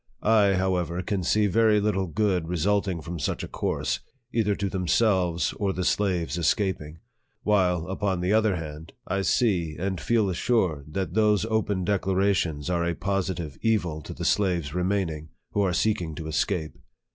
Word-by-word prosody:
I, 105 -2 +4
however, 90 -2 0
can 100 -2 -1
see 105 +4 +2
very 110 +1 +4
little 100 -2 0
good 95 -2 0
resulting 90 +1 0
from 85 +2 -6
such 70 - -2
a - - -4
course, - - -2 0.3
either 105 -3 +2
to 100 - -2
them 90 -2 -3
selves 90 -5 +2
or 100 -2 0
the 90 - -2
slaves 90 -4 0
escaping; 85 -3 0 0.5
while, 90 -5 +2
upon 95 0 -1
the 90 +3 +1
other 110 -3 +3
hand, 80 -1 -7
I 100 +1 -1
see 90 -7 +1
and 95 0 -2
feel 115 -3 +2
assured 85 - 0
that 95 -2 -2
those 105 0 +3
open 105 -4 0
declara 95 0 +2
tions 75 -5 -2
are 85 -1 0
a 85 0 -1
positive 95 -6 -2
evil 90 -9 0
to - - -8
the - - -5
slaves 90 -8 +1
remaining, 90 -4 -1 0.2
who 105 - +1
are 95 -2 +2
seeking 90 -4 0
to 80 - -6
escape. 80 -1 -2
95 Hz, 170 wpm, -26 LUFS, 85-105 Hz, 0.5 s, I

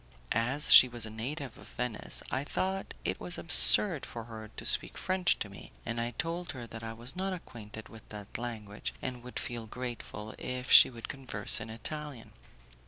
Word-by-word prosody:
As 125 +6 +5
she 130 - +12
was 120 -2 0
a 110 - -8
native 130 +4 -6
of - - -13
Venice, 125 -3 -2
I 135 - -1
thought 190 +6 -3
it - - -2
was - - -3
absurd 170 - +5
for 115 - -7
her 110 -1 -9
to - - -11
speak - - +3
French 185 -1 +1
to - - -4
me, 100 - -13
and 115 0 -2
I 120 0 -4
told 170 +2 -3
her 125 -3 -8
that 115 -1 -9
I 115 0 -6
was 120 +3 -7
not 190 +1 -2
acquainted 110 - -9
with 110 -1 -15
that 105 +1 -7
language, 110 -4 -6
and 125 -2 -6
would 125 +1 -9
feel 120 -2 -5
grateful 115 -3 -7
if 125 0 -5
she - - +9
would 115 -3 -9
converse 130 -8 0
in 110 - -7
Italian. 135 +3 -6
120 Hz, 190 wpm, -30 LUFS, 110-135 Hz, -, she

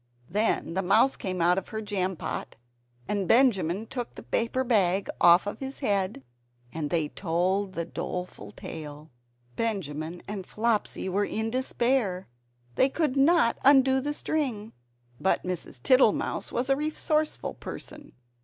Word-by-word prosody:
Then 210 -4 0
the 190 - 0
mouse 215 +8 +4
came 185 -2 -3
out 180 +2 +4
of 190 - -13
her 220 - -5
jam 195 -3 -2
pot, - - -5 0.5
and 200 -3 -1
Benjamin 215 -5 +3
took 245 +1 -6
the - - -9
paper 240 +3 0
bag 200 -6 +2
off 175 +2 +7
his 270 +1 -7
head, 200 - 0 0.5
and 155 -2 -3
they 160 -2 0
told 185 +4 -1
the 170 -1 -3
doleful 180 - -6
tale. 150 +2 -9 0.4
Benjamin 175 -7 -3
and 200 -3 -6
Flopsy 220 -3 -1
were 200 +2 +1
in 220 +1 -2
despair, 240 -6 0 0.5
they 260 - +3
could 300 -2 0
not 275 -3 +4
undo 265 -1 +5
the 295 +2 -2
string. 250 -11 -2 0.5
But 190 - +1
Mrs. 180 -8 -5
Tittlemouse 255 -5 +3
was 255 +3 0
a - - +5
resourceful 305 +1 -1
person. 295 -1 -9
205 Hz, 140 wpm, -27 LUFS, 180-260 Hz, 0.5 s, off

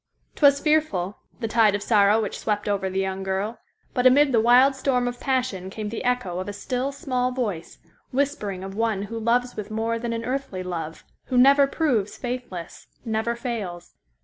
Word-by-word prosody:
'Twas 280 -1 +5
fearful—the 235 - -1
tide 220 -2 +4
of 205 - -3
sorrow 205 0 +4
which 210 -3 -3
swept 210 -1 -2
over 200 -2 0
the 190 +1 -2
young 190 0 -2
girl, 195 +4 -2 0.3
but 250 0 +4
amid 280 +2 +5
the 235 - +4
wild 250 +4 +6
storm 260 -2 0
of 245 0 -4
passion 250 -9 -1
came 210 +1 -5
the 225 - -5
echo 245 -8 -1
of 185 +2 -4
a - - -5
still, 250 +6 -2
small 255 -3 -1
voice, 215 -10 -4 0.3
whispering 255 -9 -2
of 195 0 -6
one 220 -2 0
who 225 +2 -5
loves 245 +2 +1
with 210 -1 -6
more 225 +1 -1
than 235 0 -3
an 230 0 -3
earthly 255 -8 -3
love, 165 -3 -5 0.2
who 255 - -1
never 275 +2 +6
proves 255 - 0
faithless—never 235 0 -4
fails. 210 -8 -5
230 Hz, 175 wpm, -24 LUFS, 200-255 Hz, 0.3 s, wild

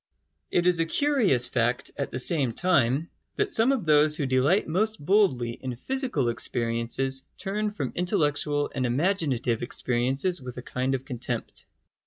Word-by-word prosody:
It 175 - +1
is 180 -2 +3
a 165 - +1
curious 215 - +3
fact, 120 +1 -1
at 140 - -3
the - - -5
same 130 -2 +2
time, 150 -3 +1 0.2
that 415 -1 0
some 230 -1 +3
of 255 -9 -1
those 150 0 +4
who 145 - -1
delight 130 +9 +2
most 215 +7 0
boldly 145 - +2
in 125 +1 -6
physical 250 - -1
experiences 115 +3 -2 0.2
turn 210 +2 -2
from 170 -12 -4
intellectual 150 -5 0
and 130 -2 -1
imaginative 135 - 0
experiences 130 +8 -1
with 125 -1 -8
a 125 - -6
kind 130 +1 -1
of 130 0 -6
contempt. 125 -2 -5
140 Hz, 155 wpm, -26 LUFS, 125-185 Hz, 0.2 s, those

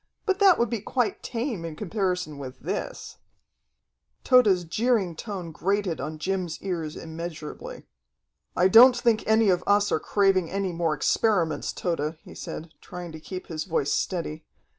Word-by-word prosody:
But 390 -2 +1
that 390 -3 +6
would 235 -2 0
be 230 -4 -2
quite 245 +2 -1
tame 230 - -3
in 165 -2 -6
comparison 180 -6 -2
with 130 -1 -7
this." - - -5 1.1
Tode's 215 -9 +5
jeering 200 0 0
tone 185 -3 -6
grated 195 0 -1
on 155 0 -5
Jim's 180 0 -2
ears 165 -5 -3
immeasurably. 160 -1 -7 0.7
"I 180 - +4
don't 245 +5 +8
think 235 -2 +2
any 220 -1 +4
of 180 - 0
us 205 0 +3
are - - +2
craving 195 -3 +2
any 195 -1 -2
more 165 -2 0
experiments, 170 0 +1
Tode," 160 -2 -2
he - - -12
said, 160 +1 -7
trying 175 -1 -8
to 160 - -9
keep 185 +3 -7
his 155 -2 -5
voice 160 -5 0
steady. 160 -4 -2
180 Hz, 155 wpm, -26 LUFS, 160-215 Hz, 1.1 s, don't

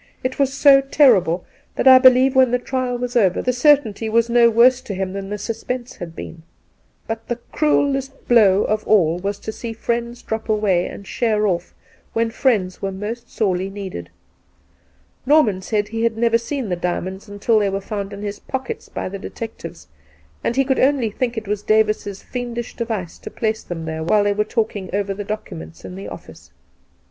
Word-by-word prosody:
It 255 +2 -3
was 275 -1 +2
so 280 0 +6
terrible 215 - +3 0.3
that - - +1
I 260 0 +10
believe 255 0 +6
when 260 -1 +5
the 250 - +2
trial 250 0 -2
was 245 +1 -4
over 195 -7 +3
the 250 - 0
cer 290 +4 +6
tainty 220 -4 -6
was 230 +1 +2
no 235 -1 +6
worse 245 +3 +5
to 200 - -6
him 190 0 -3
than 195 0 -5
the 210 - -3
suspense 240 +3 -5
had 165 -2 -8
been. 165 - -8 0.6
But 225 0 -5
the 240 - -1 0.2
cruellest 275 -2 0
blow 210 -5 +5
of 215 0 -1
all 175 -5 +3
was 200 +2 -3
to - - -5
see 230 +1 -6
friends 235 +1 -3
drop 220 0 -4
away 205 -5 +2
and 200 - -9
sheer 215 -1 0
off 175 -3 -2 0.4
when 230 0 0
friends 210 -7 0
were 195 - -2
most 210 +5 -6
sorely 190 -3 -1
needed. 190 - -7 1.2
Norman 245 -11 +4
said 210 +2 -1
he 225 +1 -3
had 230 -1 +1
never 230 0 +3
seen 250 -1 -4
the 180 - 0
diamonds 185 +3 -4
until 205 +2 +1
they 205 -1 +1
were 195 0 -2
found 200 0 -5
in 200 0 -8
his 205 0 -5
pockets 265 -1 -5
by - - -4
the 195 +1 -6
detectives, 190 -6 -8 0.6
and 235 - -1
he 270 0 +2
could 265 0 +1
only 260 -5 +2
think 240 +1 -2
it 220 -2 -4
was 205 0 -2
Davis's 215 -2 +1
fiendish 240 -2 -5
device 220 -8 -4
to - - -8
place 220 -1 -2
them 165 -2 -6
there 160 0 -4
while 205 +5 +3
they 205 0 +2
were 210 +1 0
talking 215 -4 -2
over 200 0 -1
the 205 +1 -5
documents 85 - -7
in 95 - -8
the 100 +2 -7
office. - - -11
220 Hz, 195 wpm, -20 LUFS, 195-245 Hz, 1.2 s, I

